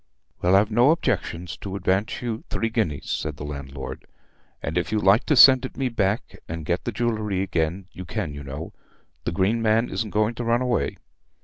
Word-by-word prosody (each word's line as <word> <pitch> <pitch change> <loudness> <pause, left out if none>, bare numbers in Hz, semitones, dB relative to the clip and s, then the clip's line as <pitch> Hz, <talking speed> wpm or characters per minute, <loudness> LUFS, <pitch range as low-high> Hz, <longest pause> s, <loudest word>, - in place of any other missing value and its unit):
"Well, 90 +2 +4
I've 100 +3 +4
no 120 +5 +5
objections 95 - -1
to 100 -1 -6
advance 100 +5 0
you 115 -2 -3
three 115 - -1
guineas," 105 - -1
said 75 -1 -3
the 75 - -6
landlord; 70 -2 -7 0.6
"and 70 - -3
if 90 +2 -1
you 110 - +1
like 100 +2 +4
to 150 - +4
send 130 0 +8
it 130 - -6
me 130 -1 0
back 105 -1 -1
and 80 -1 -5
get 85 +3 -1
the - - -1
jewellery 110 -5 -1
again, 90 0 -1
you 90 - -8
can, 90 -3 -3
you 70 0 -7
know. 70 +4 -7 0.5
The - - 0
Green 100 +6 +1
Man 115 +2 +2
isn't 110 - -2
going 105 +3 +1
to 120 - -5
run 120 +2 +2
away." 120 - 0
100 Hz, 200 wpm, -24 LUFS, 85-115 Hz, 0.6 s, send